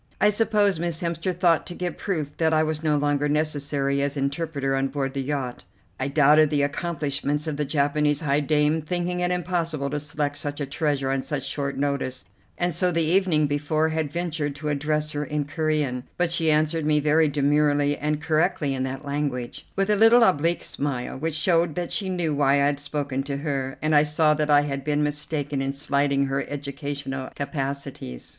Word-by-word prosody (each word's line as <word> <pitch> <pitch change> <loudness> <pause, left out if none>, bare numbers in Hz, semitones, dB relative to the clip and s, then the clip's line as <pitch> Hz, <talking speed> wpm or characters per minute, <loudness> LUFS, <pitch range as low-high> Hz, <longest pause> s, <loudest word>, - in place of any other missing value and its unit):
I 210 +1 +5
suppose 210 -4 +2
Miss 170 -1 -1
Hemster 170 +2 -1
thought 175 -2 +2
to 175 - -6
give 180 -1 -3
proof 155 -7 -3
that 160 -1 +2
I 155 - +4
was 155 -1 -2
no 155 -2 +2
longer 145 0 +1
necessary 145 -2 0
as 140 +1 -1
interpreter 140 -1 -1
on 135 0 +1
board 135 -1 -3
the 140 - -2
yacht. 135 -3 -3 0.4
I 130 - -1
doubted 150 +1 +5
the 145 -1 +1
accomplishments 150 -1 -1
of 155 -2 -2
the 150 0 -1
Japanese 145 +1 +1
high 145 -2 +2
dame, 150 +1 +2
thinking 175 +3 -2
it 180 0 +1
impossible 170 -5 -1
to 150 - -1
select 145 -1 -3
such 145 0 -4
a 145 - -1
treasure 140 -2 -1
on 135 0 0
such 135 -2 -4
short 140 -2 -3
notice, 140 -2 -2 0.3
and 175 0 0
so 180 +3 +1
the 165 -1 +1
evening 165 -2 +3
before 150 +2 0
had 160 -2 -2
ventured 160 -4 -2
to 150 +1 -4
address 150 +1 0
her 145 0 -2
in 150 0 -2
Corean; 145 -4 -1
but 175 -1 +1
she 165 -1 +1
answered 155 +1 +2
me 150 0 +3
very 155 +2 +3
demurely 145 0 +2
and 150 +1 -2
correctly 160 -2 +1
in 130 - -3
that 130 +2 -4
language, 140 -4 -3
with 195 +1 +1
a - - +4
little 225 +3 +6
oblique 170 -3 +2
smile, 135 -4 -3
which 160 +3 -3
showed 165 -2 +2
that 175 -1 -3
she 195 -2 -2
knew 175 -4 -1
why 140 -1 +3
I 140 0 +3
had 145 0 +1
spoken 145 -2 -2
to 140 0 -4
her, 140 -3 -3
and 155 0 +1
I 145 - +7
saw 150 +1 +3
that 150 0 -1
I 145 -1 +6
had 140 -2 -3
been 150 0 +1
mistaken 145 -1 -2
in 135 0 -1
slighting 140 0 +1
her 135 0 -1
educational 140 -2 -5
capacities. 140 - -4
150 Hz, 195 wpm, -24 LUFS, 140-160 Hz, 0.4 s, I